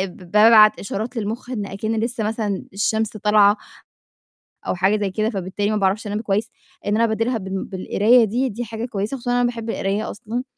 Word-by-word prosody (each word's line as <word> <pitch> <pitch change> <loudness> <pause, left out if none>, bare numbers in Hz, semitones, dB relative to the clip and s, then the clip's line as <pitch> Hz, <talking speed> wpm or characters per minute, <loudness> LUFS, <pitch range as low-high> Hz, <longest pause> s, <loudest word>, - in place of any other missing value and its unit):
بابعت 215 +3 +5
إشارات 220 +5 -4
للمُخ 225 +3 -4
إن 220 -6 -3
أكِن 215 +3 -3
لسّه 230 +1 -2
مثلًا 210 -2 -2
الشمس 220 +2 0
طالعة 210 0 +4 1.1
أو - - 0
حاجة 190 +4 +2
زي 205 -2 -1
كده، 215 +3 0
فبالتالي 200 -1 -2
ما 215 - 0
باعرفش 200 +2 0
أنام 210 +1 -2
كويس، 210 +1 -1 0.4
إن 205 - +1
أنا 230 - +2
أبدِّلها 230 +2 0
بال 190 -2 -4
بالقراية 210 +5 +3
دي، 245 +5 -1
دي 240 +2 -5
حاجة 225 +1 -5
كويسة، 215 +2 -3
خصوصًا 245 -1 -3
أنا 245 0 +2
باحب 235 -2 -2
القراية 200 0 -2
أصلًا، 230 +3 -5
215 Hz, 180 wpm, -21 LUFS, 200-230 Hz, 1.1 s, بابعت